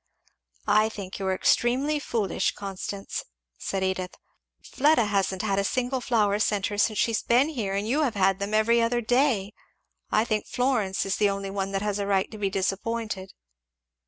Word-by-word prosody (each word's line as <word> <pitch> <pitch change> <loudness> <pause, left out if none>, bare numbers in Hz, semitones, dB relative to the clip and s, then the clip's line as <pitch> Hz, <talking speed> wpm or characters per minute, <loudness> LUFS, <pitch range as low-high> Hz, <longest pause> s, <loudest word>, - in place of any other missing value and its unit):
"I 215 +1 +4
think 200 -4 -7
you 195 - -2
are 190 - +1
extremely 265 +9 +2
foolish, 225 -8 -1
Constance," 195 0 -5 0.4
said 195 -1 -2
Edith. 185 -1 -2 0.5
"Fleda 285 -4 +3
hasn't 195 -2 0
had 200 -2 +1
a - - +1
single 255 +5 -1
flower 210 -4 +1
sent 205 -2 +1
her 205 - -3
since 215 0 +2
she 230 - +2
has 220 - 0
been 250 +6 +3
here 215 -10 -3
and 200 +2 -1
you 280 +7 +1
have 255 -7 0
had 195 -1 +2
them 200 +2 -2
every 230 +2 +4
other 240 +1 +1
day. 235 -4 +1 0.6
I 215 - +2
think 215 -2 -1
Florence 245 -7 0
is 195 - -1
the 205 - +3
only 195 0 -3
one 195 0 -2
that 195 +1 -1
has 210 -1 -1
a 200 - -2
right 195 -1 +1
to 215 - -9
be 200 -1 0
disappointed." 195 +1 -3
210 Hz, 190 wpm, -26 LUFS, 195-235 Hz, 0.6 s, I